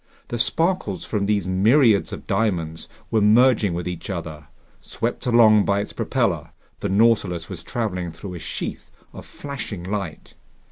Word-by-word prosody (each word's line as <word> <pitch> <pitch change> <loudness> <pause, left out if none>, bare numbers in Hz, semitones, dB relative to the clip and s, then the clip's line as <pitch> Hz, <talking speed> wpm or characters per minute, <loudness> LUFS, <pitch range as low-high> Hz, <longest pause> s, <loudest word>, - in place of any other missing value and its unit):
The 120 - -3
sparkles 165 - 0
from 100 -2 -1
these 100 -2 +1
myriads 110 +4 +4
of - - -7
diamonds 85 -7 -1 0.2
were 110 -2 +3
merging 110 -3 +4
with 90 +1 -4
each 90 +1 -6
other. 80 -5 -6 0.3
Swept 120 +2 -4
along 110 -3 +6
by 100 0 +1
its 100 - -5
propeller, - - -1 0.3
the 100 - -2
Nautilus 100 -5 +2
was 90 -4 -7
traveling 90 -7 -3
through 90 +3 -8
a 85 - -6
sheath - - -5 0.2
of - - -10
flashing 125 -10 -6
light. 95 -4 -5
100 Hz, 150 wpm, -23 LUFS, 90-115 Hz, 0.3 s, along